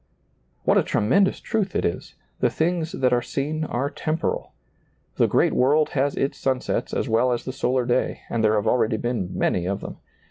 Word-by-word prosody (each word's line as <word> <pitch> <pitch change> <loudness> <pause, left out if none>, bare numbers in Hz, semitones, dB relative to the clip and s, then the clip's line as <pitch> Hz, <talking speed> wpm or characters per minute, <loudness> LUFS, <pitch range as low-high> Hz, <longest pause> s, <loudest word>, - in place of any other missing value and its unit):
What - - +4
a - - +2
tremendous 190 - +2
truth 210 -5 -2
it - - +1
is! 85 - -3 0.2
The - - +3
things 165 0 -1
that 125 -2 +1
are 120 - +3
seen 150 +5 -3
are 130 0 -1
temporal. 155 +1 -2 0.7
The - - +4
great - - +2
world 150 +4 +3
has 140 +1 0
its 135 - -1
sunsets 130 -1 -1
as - - -1
well 120 +2 +2
as 120 - -2
the 130 - -4
solar 130 -1 0
day, 125 +1 0
and 115 -1 -1
there 110 0 +4
have 105 0 0
already 110 -1 +2
been 120 -6 -2
many 90 -1 0
of 100 +1 -2
them. - - -7
130 Hz, 190 wpm, -24 LUFS, 115-150 Hz, 0.7 s, What